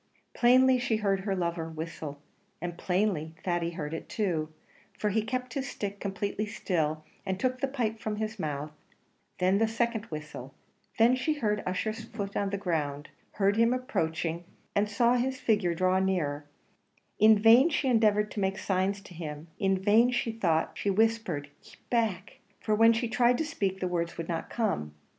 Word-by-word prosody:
Plainly 255 +1 +5
she 245 -2 0
heard 200 -3 +1
her 195 0 -2
lover 170 -2 -2
whistle; 160 -2 -6 0.4
and 175 +1 -4
plainly 180 -4 -1
Thady 175 -2 0
heard 160 -3 -5
it 165 - -6
too, 165 -7 -1 0.5
for 210 - 0
he 220 +2 +2
kept 250 +2 -3
his 275 0 -3
stick 200 -1 -5
completely 200 +2 -3
still, 155 -6 -1 0.2
and 190 0 -3
took 255 0 0
the 275 - +2
pipe 235 -5 -2
from 215 -1 -3
his 215 0 -4
mouth: 150 -2 -3 0.7
then 185 +2 +2
the 225 - +3
second 230 -1 -1
whistle 150 - -8 0.4
then 235 +3 +5
she 260 +5 0
heard 210 -7 0
Ussher's 215 +4 -2
foot 200 -4 -6
on 200 -1 0
the 200 - -2
ground 155 -6 -2 0.2
heard 200 +1 +2
him 230 +2 +4
approaching, 170 -9 -2 0.3
and 205 +1 +2
saw 235 +4 +3
his 260 +2 -1
figure 205 -6 +1
draw 185 +2 +2
nearer; 155 -7 -1 0.7
in 215 0 +7
vain 230 +8 +7
she 295 -3 0
endeavoured 210 -3 +3
to - - -4
make 195 0 0
signs 195 +1 0
to 185 - -13
him, 155 -1 -7
in 195 -1 +2
vain 210 +6 +4
she 240 -2 0
thought 170 -8 +1
she 205 - -1
whispered, 215 -8 +1
"keep - - -19
back;" 215 -5 -1 0.2
for 215 - -1
when 225 +2 +6
she 230 +1 0
tried 240 +1 +3
to 320 - -1
speak, 190 -8 -2
the 185 - -1
words 170 -2 -2
would 165 -1 -4
not 165 -2 -3
come. 135 - -2
200 Hz, 180 wpm, -29 LUFS, 170-225 Hz, 0.7 s, in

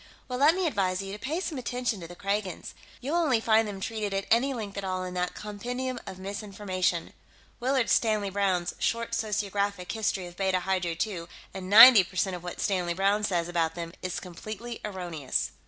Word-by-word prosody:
"Well, 250 -1 -3
let 300 +4 +6
me 375 -1 0
advise 195 - 0
you 195 0 -6
to 210 - -7
pay 300 +9 -2
some 315 -8 -3
attention 245 -3 -2
to 170 - -8
the 175 - -11
Kragans. 195 -1 -3 0.3
You'll 285 +7 -1
only 290 -9 +3
find 225 0 +3
them 200 -2 -6
treated 210 -1 -3
at 195 - -1
any 245 +5 +4
length 215 -6 -5
at - - -6
all 185 -1 -2
in 180 0 -5
that 180 0 -2
compendium 245 +5 -4
of 185 - -7
misinformation, 190 -3 -2 0.5
Willard 255 -1 +1
Stanley 215 -3 +2
Browne's 190 -3 0
Short 230 0 -1
Sociographic 200 -3 -1
History 215 -4 -1
of 175 0 -10
Beta 190 -1 +1
Hydrae 180 -3 -1
II, 175 -6 -6 0.3
and 185 -1 -6
ninety 225 0 +11
percent 185 +1 -1
of 175 - -7
what 175 - -6
Stanley 180 -3 0
Browne 200 +3 +2
says 175 -4 0
about 165 -2 0
them 170 -1 -6
is 185 -1 -3
completely 215 +6 -7
erroneous." 175 -9 -2
200 Hz, 190 wpm, -28 LUFS, 185-225 Hz, 0.5 s, ninety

